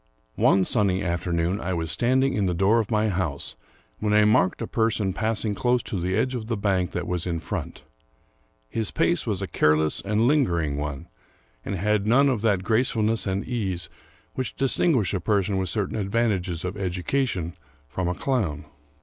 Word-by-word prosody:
(^NE 95 -1 +4
sunny 100 -4 +1
afternoon 85 +1 -1
I 95 0 -2
was 80 -2 -2
standing 130 - +2
in 100 -2 +1
the 90 - 0
door 100 +6 +3
of 110 - -2
my 110 -1 +2
house, 85 -7 -3 0.4
when 105 - 0
I 105 0 +5
marked 105 -3 +3
a - - -1
person 110 -4 0
passing 110 0 -1
close 120 +3 +1
to 95 - -4
the 95 +3 0
edge 130 +3 +1
of 115 -3 -4
the 115 -1 -1
bank 95 -3 +1
that 90 0 -2
was 90 -1 -1
in 85 -2 -1
front. 80 - -5 0.8
His 110 - -2
pace 170 -7 +1
was 100 -3 -1
a - - -3
care 75 -3 +3
less 80 0 -1
and 105 +2 0
lingering 85 - +2
one, 75 -2 -4 0.6
and 100 - -3
had 105 +2 0
none 140 +5 +5
of 125 -6 0
that 100 -5 +1
gracefulness 110 0 +1
and 95 +1 -1
ease 95 -8 -2 0.4
which 130 -1 -4
distinguish 135 - +2
a 95 - 0
person 100 +1 +1
with 95 -2 -1
certain 105 +1 -2
advantages 100 -5 -1
of 90 +3 -4
education 90 - -1 0.3
from 85 +6 -3
a 90 - -1
clown. 90 - -1
100 Hz, 185 wpm, -25 LUFS, 90-115 Hz, 0.8 s, I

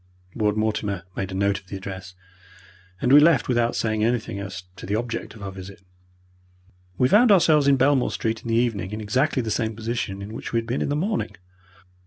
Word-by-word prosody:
Ward 105 -1 0
Mortimer 105 -4 -1
made 95 - -3
a - - -5
note 100 +1 +1
of 95 - -26
the 100 - -6
address, 95 -1 -8 0.9
and 125 - +3
we 145 - +10
left 150 -3 +4
without 120 -1 +1
saying 110 -1 0
anything 115 -3 -1
as 95 -2 -6
to - - -9
the 100 - 0
object 115 -1 -4
of 105 - -11
our 100 - -5
visit. 95 +1 -11 1.1
We 125 - +4
found 215 - +5
ourselves 155 -6 +5
in 140 -1 +5
Belmore 135 0 +3
Street 110 -1 -2
in - - -10
the 115 - +1
evening 110 -5 0
in 110 - -4
exactly 130 +5 0
the 110 - -3
same 110 -1 -1
position 110 -3 -3
in 105 +2 -8
which 115 - -7
we - - +2
had 115 - -1
been 120 +3 -2
in - - -1
the 145 - 0
morning. 200 +8 -2
110 Hz, 215 wpm, -24 LUFS, 100-125 Hz, 1.1 s, we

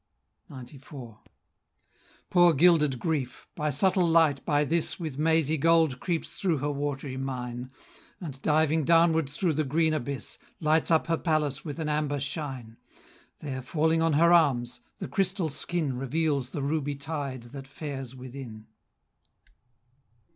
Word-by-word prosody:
XCIV. 130 -3 -11 1.1
Poor 175 -2 +6
gilded 150 -3 +4
Grief! 145 -3 -3
the 150 -1 -2
subtle 180 +5 +2
light 160 -4 +3
by 150 -2 +1
this 165 +5 0
With 155 -5 -5
mazy 160 -1 +2
gold 160 -4 +3
creeps 170 +1 -3
through 180 -6 +1
her 145 +2 -2
watery 140 -2 -4
mine, 125 -2 -5 0.5
And, 140 -7 -8
diving 155 +1 +2
downward 165 -1 +3
through 160 +3 0
the 155 +1 0
green 155 +3 +1
abyss, 140 -4 -4 0.2
Lights 155 0 +2
up 160 -1 +3
her 165 -1 0
palace 150 -4 -1
with 150 -2 -6
an 160 - -2
amber 150 -1 -1
shine; 135 -6 -5 0.6
There, 135 -3 -4
falling 160 +4 +1
on 165 -1 +2
her 170 +4 +5
arms, 125 -7 +2 0.2
the - - -5
crystal 185 +2 0
skin 150 -1 -2
Reveals 140 0 -1
the 140 0 -4
ruby 145 0 -1
tide 140 -3 -4
that 135 -1 -8
fares 135 -3 -7
within. 125 -4 -9
150 Hz, 140 wpm, -27 LUFS, 135-160 Hz, 1.1 s, Poor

